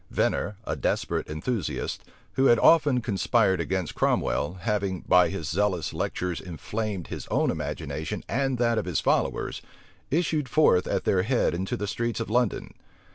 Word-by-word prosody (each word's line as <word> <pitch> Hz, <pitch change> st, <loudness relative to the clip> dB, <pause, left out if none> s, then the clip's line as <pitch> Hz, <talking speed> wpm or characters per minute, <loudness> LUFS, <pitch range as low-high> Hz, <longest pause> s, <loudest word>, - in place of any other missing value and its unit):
Venner, 105 Hz, -, 0 dB
a -, -, -2 dB
desperate -, -, -1 dB
enthusiast, 80 Hz, -, -3 dB, 0.3 s
who 135 Hz, -, +2 dB
had 120 Hz, -, +6 dB
often 145 Hz, -3 st, +5 dB
conspired 100 Hz, -3 st, +2 dB
against 90 Hz, 0 st, -2 dB
Cromwell, 85 Hz, +6 st, 0 dB
having, 100 Hz, -2 st, -1 dB
by 90 Hz, -1 st, +4 dB
his 90 Hz, -5 st, -4 dB
zealous 90 Hz, +1 st, 0 dB
lectures 90 Hz, -2 st, -2 dB
inflamed 95 Hz, +2 st, -4 dB
his -, -, -6 dB
own -, -, +1 dB
imagination -, -, -4 dB
and 135 Hz, 0 st, 0 dB
that 115 Hz, -1 st, +2 dB
of -, -, -4 dB
his 90 Hz, -3 st, 0 dB
followers, -, -, 0 dB, 0.5 s
issued 155 Hz, -3 st, 0 dB
forth 110 Hz, -13 st, +4 dB
at -, -, -1 dB
their 95 Hz, -, +2 dB
head 120 Hz, +6 st, +1 dB
into 95 Hz, +2 st, -2 dB
the 105 Hz, -, -3 dB
streets 115 Hz, +3 st, -2 dB
of 115 Hz, -2 st, -4 dB
London. 120 Hz, -2 st, 0 dB
105 Hz, 155 wpm, -26 LUFS, 90-120 Hz, 0.5 s, had